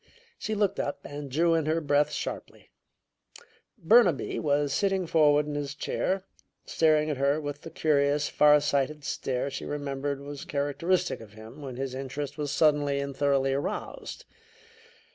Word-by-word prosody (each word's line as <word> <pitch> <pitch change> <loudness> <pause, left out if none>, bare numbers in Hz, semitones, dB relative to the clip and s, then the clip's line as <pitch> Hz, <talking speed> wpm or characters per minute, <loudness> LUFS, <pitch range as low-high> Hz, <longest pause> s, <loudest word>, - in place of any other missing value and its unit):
She 215 - -2
looked 205 -2 0
up 145 - -2
and 145 0 -7
drew 165 +5 +2
in 160 -2 +1
her 160 +1 +2
breath 145 -1 +2
sharply. - - -6 1.1
Burnaby 190 - +3
was 145 -1 +1
sitting 195 0 +1
forward 150 -3 +4
in 150 - -5
his 145 -1 -4
chair, 190 +5 -1 0.4
staring 155 -1 +2
at 145 - -3
her 140 +3 +2
with 145 -1 -5
the - - -8
curious, 145 -2 +1
far 150 0 +5
sighted 145 +1 0
stare 135 0 -2
she 135 - -5
remembered 140 -1 -3
was 140 0 -8
characteristic 165 +5 -1
of 105 -2 -13
him 110 +6 -12
when 135 -3 -7
his 135 0 -4
interest 135 +2 -5
was 145 -2 -3
suddenly 145 -3 +2
and 140 -1 -4
thoroughly 135 -1 +2
aroused. 145 - -4
145 Hz, 155 wpm, -28 LUFS, 140-155 Hz, 1.1 s, far